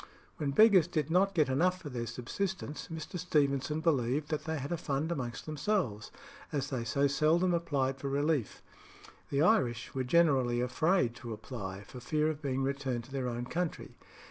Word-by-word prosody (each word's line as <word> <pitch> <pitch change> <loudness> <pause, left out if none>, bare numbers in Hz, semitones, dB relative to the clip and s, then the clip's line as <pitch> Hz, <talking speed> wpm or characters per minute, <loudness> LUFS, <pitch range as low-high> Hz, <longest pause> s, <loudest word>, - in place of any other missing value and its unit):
When 145 - -1
beggars 190 +1 +6
did 155 -3 -1
not 195 +2 +3
get 155 -4 +4
enough 180 +8 +2
for 155 - -7
their 120 -3 -4
subsistence, 155 +6 -4
Mr. 160 +2 -5
Stevenson 150 -3 +1
believed 145 -2 +1
that 155 - -2
they 160 0 -2
had 140 +2 -5
a - - +1
fund 155 0 -2
amongst 120 -7 -4
themselves, 155 - -1 0.4
as 145 0 -2
they 125 -3 -1
so 140 +5 +1
seldom 160 +5 +3
applied 135 -6 0
for 140 - -3
relief. 145 -3 0 0.7
The 140 +2 +2
Irish 125 - +2
were 130 - -1
generally 130 -4 +3
afraid 130 +2 +2
to 115 -1 -6
apply, 100 -4 -6
for 125 - -10
fear 155 +5 +1
of 155 -1 -8
being 135 -2 -1
returned 135 -3 -2
to 130 - -16
their 135 -2 -2
own 120 0 -3
country. 170 +5 -3
140 Hz, 175 wpm, -31 LUFS, 125-165 Hz, 0.7 s, beggars